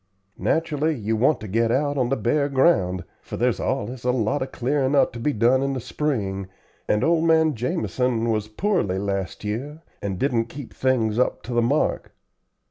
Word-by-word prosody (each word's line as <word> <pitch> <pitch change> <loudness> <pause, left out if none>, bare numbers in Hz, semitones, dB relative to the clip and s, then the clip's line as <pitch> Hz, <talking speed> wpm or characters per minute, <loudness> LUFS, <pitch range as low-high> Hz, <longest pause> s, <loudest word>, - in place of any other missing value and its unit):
Nat'rally 160 -1 0
you 110 -2 -1
want 135 +7 +3
to 110 - -6
get 115 +3 +1
out 145 +3 +1
on 125 -3 +1
the 135 - +2
bare 140 +5 +1
ground, 95 - +2 0.2
for - - -7
there's - - +1
allus 120 +4 -2
a 125 - 0
lot 125 +2 +1
of 130 - -3
clearin' 135 +2 0
up 140 - +3
to 120 - -7
be 150 +6 +1
done 120 +2 +3
in 135 0 0
the 130 - -2
spring 105 -9 -2 0.4
and 105 - +2
old 165 0 +3
man 160 -1 +4
Jamison 125 -3 -1
was 110 -1 -1
poorly 110 - 0
last 100 0 -3
year 135 +10 -4 0.2
and 100 -2 -3
didn't 120 -1 +1
keep 130 +2 -9
things 120 -4 +1
up 125 - 0
to 120 - -5
the 120 - +3
mark." 135 +6 0
125 Hz, 190 wpm, -23 LUFS, 110-145 Hz, 0.4 s, man